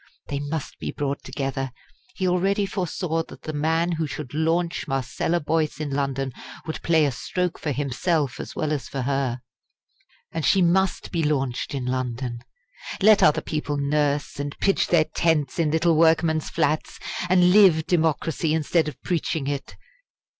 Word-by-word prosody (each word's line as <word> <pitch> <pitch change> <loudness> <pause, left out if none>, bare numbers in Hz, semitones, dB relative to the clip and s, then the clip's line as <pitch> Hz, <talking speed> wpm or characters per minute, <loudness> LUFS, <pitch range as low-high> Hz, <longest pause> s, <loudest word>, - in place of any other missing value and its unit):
They 140 - -2
must 145 +1 -5
be - - -4
brought 140 0 -3
together. 135 -1 -3 0.4
He 185 - -1
already 195 +3 +2
foresaw 180 -3 -2
that - - -13
the 155 - -5
man 160 +3 +1
who 160 -2 -1
should 145 -3 -7
launch 165 +2 0
Marcella 135 +6 -1
Boyce 155 -2 -1
in 150 -2 -3
London 135 -1 -1 0.3
would 160 - -5
play 160 -2 +3
a 140 - +1
stroke 180 +7 -2
for 150 - -2
himself 145 +1 -1
as - - -7
well 155 -1 -1
as 145 -3 -3
for 135 - -3
her. 135 -2 -1 0.9
And 165 -1 -3
she 145 +9 +4
must 185 +1 +2
be 170 - 0
launched 135 -3 -1
in 130 -2 -3
London. 125 -1 -2 0.6
Let 210 +1 +6
other 150 - +5
people 150 -2 -3
nurse, 145 0 0
and 145 0 -4
pitch 195 - +2
their 165 -3 +4
tents 155 -2 0
in 160 -2 +2
little 160 +2 +3
workmen's 160 -1 +3
flats, 155 +2 0 0.3
and 180 -1 +5
live 180 -6 +6
democracy 160 -1 +1
instead 160 +1 +1
of 150 - -6
preaching 160 -4 -1
it. 140 -1 -4
155 Hz, 160 wpm, -24 LUFS, 140-165 Hz, 0.9 s, Let